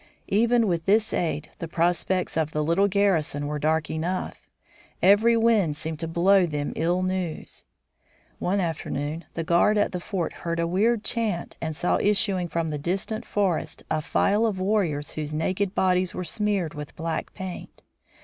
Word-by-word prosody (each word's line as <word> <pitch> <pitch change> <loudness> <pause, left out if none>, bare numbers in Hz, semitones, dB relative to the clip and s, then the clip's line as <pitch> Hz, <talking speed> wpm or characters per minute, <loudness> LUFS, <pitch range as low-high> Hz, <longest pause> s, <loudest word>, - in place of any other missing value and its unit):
Even 230 +3 +3
with 170 -4 -1
this 215 +2 +3
aid 155 -3 -2
the 165 - -4
prospects 175 +2 0
of 160 -2 +1
the 150 - 0
little 170 +6 +3
garrison 185 -8 +1
were 150 0 -3
dark 155 +1 +1
enough. 175 +4 -4 0.5
Every 215 +5 +5
wind 215 -10 +3
seemed 160 -1 -3
to 165 - -2
blow 180 +3 +4
them 145 -2 -3
ill 175 +3 +1
news. 185 -3 -4 0.7
One 195 +3 0
afternoon 160 -2 -3
the 165 - -2
guard 175 +5 +3
at 205 - +2
the 180 - -3
fort 175 -1 -3
heard 170 0 -2
a 170 - +1
weird 210 +6 +1
chant 220 -7 -1
and 160 -1 -3
saw 175 - +1
issuing 195 -3 +1
from 165 -1 -2
the 150 - -3
distant 195 +8 -2
forest 195 -5 -1
a 155 0 +1
file 210 +8 +2
of 200 -4 -2
warriors 185 -7 0
whose 155 0 -4
naked 190 +5 -1
bodies 185 -1 +1
were 185 - -3
smeared 195 -2 0
with 150 -1 -8
black 165 -1 -4
paint. 190 -1 -8
180 Hz, 170 wpm, -25 LUFS, 160-200 Hz, 0.7 s, Every